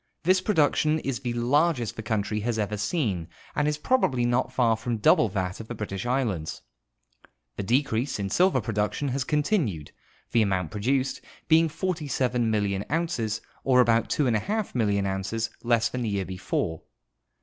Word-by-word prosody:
This 185 +2 +4
production 155 -5 +2
is 135 -5 -3
the 120 -3 -3
largest 125 0 +1
the - - -5
country 105 -1 -1
has 115 +1 -1
ever 105 -1 -1
seen 105 - -1 0.3
and 150 - +1
is 150 0 0
probably 150 - +1
not 120 +2 +1
far 115 -3 +3
from 115 +1 -3
double 110 +1 +4
that 95 -1 -3
of 110 - -8
the 120 - -5
British 105 0 -4
islands. 115 -12 -1 0.9
The - - -3
decrease 125 +3 0
in 100 -1 -3
silver 185 - +3
production 110 +6 -1
has 130 +1 -1
continued, 145 - 0 0.4
the 115 - +4
amount 95 -6 0
j)roduced 130 +5 0 0.3
being 160 0 +5
47,000,000 125 - -1
ounces, 125 -10 -1 0.2
or 130 -1 +4
about 115 -2 +3
24 150 - 0
million 100 -4 +1
ounces 100 +4 -2
less 115 -1 +2
than 125 - -4
the 115 - -1
year 100 -2 -1
before. 90 -3 -3
120 Hz, 155 wpm, -26 LUFS, 105-145 Hz, 0.9 s, being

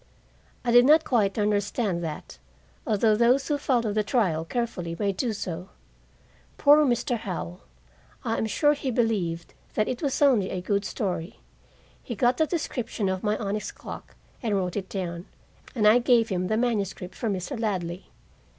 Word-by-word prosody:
I 240 - +2
did 245 +1 +7
not 310 +3 +6
quite 210 -8 +1
understand 205 -3 0
that, 155 -2 -6 0.5
although 215 0 +3
those 245 +5 +3
who 290 -2 0
followed 235 -6 +1
the 215 0 +1
trial 195 -8 +1
carefully 175 -4 -3
may 200 +1 +1
do 225 +5 -2
so. 180 -3 -5 0.9
Poor 295 +1 +6
Mr. 240 -2 0
Howell! 90 - -5 0.6
I 225 - 0
am 220 - 0
sure 295 +8 +3
he 280 -2 -3
believed 205 -9 -1 0.2
that 215 - +1
it 250 - -3
was 280 -4 -1
only 250 -10 +4
a 185 - -3
good 200 +2 -1
story. 185 -4 -3 0.6
He 235 - -6
got 245 +4 +2
the 315 - +2
description 245 - -2
of 190 0 -2
my 210 0 0
onyx 210 0 -3
clock - - -10 0.3
and 220 -5 0
wrote 180 -2 -1
it 195 -2 -4
down, 175 -2 -4 0.5
and 210 -3 +3
I 220 +3 +7
gave 235 -2 +3
him 180 -2 -1
the 215 +2 0
manuscript 205 -6 -1
for 230 - -3
Mr. 200 +6 -3
Ladley. 185 -5 -3
215 Hz, 170 wpm, -26 LUFS, 190-240 Hz, 0.9 s, did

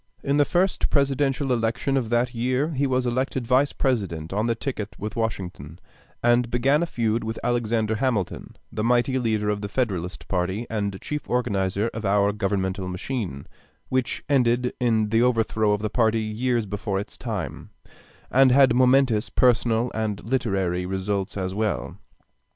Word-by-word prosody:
In 140 +1 +1
the 145 - +5
first 180 +4 +1
Presidential 140 -1 +1
election 115 +4 0
of 125 -5 0
that 120 +1 +1
year 130 +5 0
he 140 -3 0
was 130 -1 0
elected 130 +1 -1
Vice 130 +4 +3
President 95 - -1
on 105 +3 0
the 115 - +1
ticket 110 -6 -5
with 105 +2 -5
Washington; 90 -9 -4 0.5
and 120 0 +3
began 135 +6 +2
a 170 - 0
feud 115 -4 -1
with 110 0 -4
Alexander 115 -2 0
Hamilton, 115 -7 -2 0.2
the 105 - -3
mighty 125 +2 +2
leader 110 -3 0
of 105 -1 -1
the 100 - -4
Federalist 90 - -2
party 95 +6 -1
and 100 -3 -2
chief 150 0 -5
organizer 105 -3 0
of 115 - -5
our 100 0 +3
governmental 95 -2 -1
machine, 90 - -4 0.4
which 130 -2 -1
ended 125 -2 +2
in 110 -4 +2
the 115 +2 +3
overthrow 115 -3 +2
of 105 0 0
the 110 - 0
party 110 -2 +2
years 115 +2 -1
before 100 0 -2
its 100 - -7
time, 105 -8 -5 0.6
and 135 0 +5
had 135 -1 +6
momentous 125 -3 +3
personal 120 -1 +2
and 110 -2 -3
literary 95 -8 0
results 95 +2 -2
as 95 -1 -2
well. 105 0 -2
115 Hz, 160 wpm, -24 LUFS, 100-125 Hz, 0.6 s, had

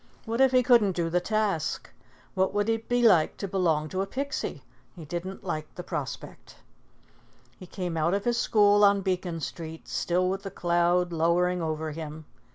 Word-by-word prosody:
What 230 +2 -1
if 265 -1 +5
he 255 -1 +4
couldn't 230 -7 +4
do 165 -1 -1
the 180 +1 +2
task? 210 -5 -1 0.5
What 190 +1 0
would 205 +1 +1
it 225 0 -2
be 245 0 +2
like 180 -9 +4
to 200 - -4
belong 165 -5 +1
to 185 +3 -2
a 195 - -2
Pixie? 275 +6 -4 0.3
He 165 -4 -10
didn't 175 +5 -6
like 155 -4 -5
the - - -6
prospect. - - -6 1.0
He 185 - -10
came 180 -2 -4
out 165 +4 +1
of 200 - -3
his 240 -1 +1
school 205 -2 +4
on 200 -1 +5
Beacon 180 -3 -2
Street, 160 +1 -7
still 180 +1 0
with 190 +1 -2
the 195 - -6
cloud 175 0 +1
lowering 175 +2 +1
over 155 -1 -3
him. 155 0 -7
180 Hz, 180 wpm, -27 LUFS, 165-205 Hz, 1.0 s, if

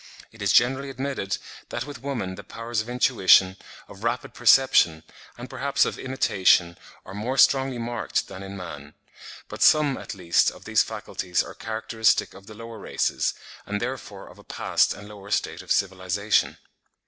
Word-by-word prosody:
It 110 - -15
is 100 -2 +2
generally 135 +5 +3
admitted 135 -7 -3 0.3
that 120 - -3
with 145 -5 -9
woman 120 -10 -3
the 100 - -10
powers 115 +3 -4
of 110 - -9
intuition, 95 -7 +4 0.3
of 100 +2 -13
rapid 120 +2 -2
perception, 120 -10 +4 0.3
and 120 +1 -8
perhaps 140 +2 +1
of - - -4
imitation, 95 -9 +2 0.3
are 95 - -10
more 115 +7 -3
strongly 135 -2 +4
marked 120 0 -2
than 95 - -9
in 100 0 -8
man; 75 -5 -9 0.5
but - - -9
some, 150 -3 +5
at - - -7
least, 90 -3 +2
of - - -14
these - - +3
faculties 90 -1 -2
are - - -10
characteristic 110 0 0
of 95 +1 -15
the 110 - -11
lower 115 0 -9
races, - - -1 0.3
and 105 0 -2
therefore 120 -5 -6
of - - -15
a - - -15
past - - +1
and 105 - -11
lower 100 -1 -12
state - - -1
of - - -9
civilisation. 95 +2 +1
110 Hz, 170 wpm, -25 LUFS, 95-125 Hz, 0.5 s, some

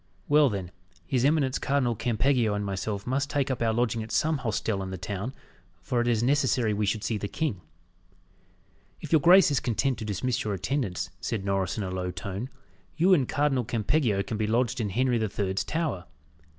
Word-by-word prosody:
Well, 145 -1 +5
then, 95 -4 -4 0.3
his 130 -4 0
eminence 140 -2 +2
Cardinal 135 -4 +1
Campeggio 120 0 +1
and 105 0 -2
myself 100 +1 -3
must 135 +3 -1
take 140 -2 0
up 130 - -3
our 115 -1 +2
lodging 115 -1 0
at 110 +1 -7
some 150 +7 +1
hostel 110 -4 -1
in 95 - -5
the 95 - -5
town, 100 +6 -4 0.5
for 120 -1 0
it 120 - -1
is 115 -2 +2
necessary 130 -4 +2
we 105 0 0
should 105 +1 -1
see 110 -2 -1
the 100 - -3
king." 110 - -2 1.4
"If - - -9
your 160 -3 +5
grace 180 +1 +7
is 140 - +2
content 130 +2 0
to 110 - -5
dismiss 115 +4 -1
your 105 -2 -2
attendants," 95 -4 -2
said 100 +2 -3
Norris 95 -1 -1
in 105 - -1
a 95 - -4
low 90 0 -3
tone, 100 +6 -5 0.5
"you 185 +3 +5
and 140 -8 +2
Cardinal 140 -3 +1
Campeggio 115 -2 +1
can 110 +3 -4
be 110 0 0
lodged 120 +2 +1
in 105 - -1
Henry 125 +3 +1
the 110 -1 -1
Third's 95 -1 -1
Tower. 155 - -2
115 Hz, 200 wpm, -27 LUFS, 100-135 Hz, 1.4 s, grace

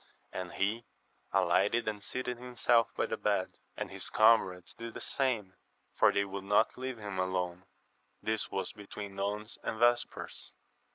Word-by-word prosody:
And 90 -1 -4
he 110 +4 0 0.4
alighted 115 +2 +3
and 105 -1 -2
seated 125 0 -3
himself 120 -2 +3
by - - +2
the - - -3
bed, - - 0 0.2
and - - -4
his - - -4
comrades 95 -5 +4
did 115 0 -8
the - - -4
same, 115 -8 0 0.4
for - - +6
they 100 0 +2
would 100 0 -6
not 105 +3 +3
leave 130 -1 -4
him 100 -3 -5
alone. 90 -1 -1 0.5
This 110 0 0
was 95 -1 -2
between 100 -1 -8
nones 105 +2 -3
and 110 - -3
vespers. 120 +1 +1
105 Hz, 155 wpm, -32 LUFS, 95-115 Hz, 0.5 s, for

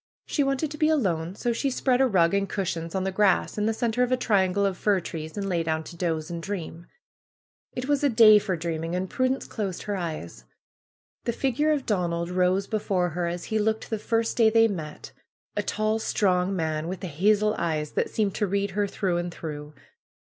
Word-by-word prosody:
She 290 - 0
wanted 275 +2 -1
to 300 - -8
be 310 - +3
alone; 185 - 0
so 240 +2 -1
she 275 +4 0
spread 255 0 +1
a 265 - +5
rug 175 -6 +3
and 200 0 +1
cushions 170 -3 -3
on 190 - 0
the 190 - -1
grass 195 -1 +2
in 210 0 0
the - - +3
center 235 +1 -1
of 250 0 +2
a 255 - +3
triangle 200 -4 +2
of 195 -1 0
fir 200 +1 +2
trees, 160 0 -7
and 200 -1 -2
lay 175 -3 0
down 160 -1 -1
to 170 - -10
doze 165 -2 -2
and 170 -1 -4
dream. 170 -3 -6 0.9
It 250 +1 -4
was 290 0 +1
a 285 - +4
day 220 -3 +7
for 200 -3 -2
dreaming, 165 +1 -3
and 185 +1 -1
Prudence 255 +5 0
closed 195 -5 -4
her 205 - -2
eyes. 155 - -5 0.8
The 235 - 0
figure 270 +5 +1
of 290 -3 0
Donald 170 -4 -1
rose 185 +2 +2
before 195 -4 0
her, 175 +1 -2
as 175 0 -4
he 220 - -1
looked 220 +2 -1
the 220 - -1
first 225 +1 -1
day 225 -2 +6
they 225 0 +5
met; 160 -8 -6 0.4
a - - +1
tall, 215 +1 -1
strong 190 -3 +1
man, 160 -2 -2
with 185 +2 -5
hazel 205 +6 +2
eyes 155 -3 -1
that - - -1
seemed 205 -3 0
to 210 - +1
read 200 +1 -1
her 205 +1 0
through 185 -3 -1
and 175 0 -3
through. 150 -2 -7
195 Hz, 210 wpm, -26 LUFS, 170-220 Hz, 0.9 s, day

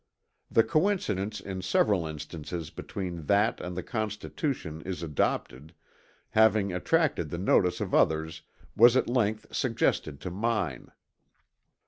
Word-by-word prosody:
The 115 - +4
coincidence 110 - 0
in 95 -1 -6
several 90 -1 +2
instances 80 +1 -6
between 85 -6 -6
that 105 +3 +3
and 90 0 -6
the 90 - -3
Constitution 110 - -3
as 90 -2 -5
adopted, 75 -1 -2 0.6
having 110 -3 +4
attracted 140 - +1
the 85 - -4
notice 90 -1 +2
of - - -4
others 80 0 +2 0.3
was 120 +3 +7
at - - +1
length 110 -3 -1
suggested 70 -2 0
to 90 - -5
mine. 100 - -2
95 Hz, 120 wpm, -28 LUFS, 80-110 Hz, 0.6 s, was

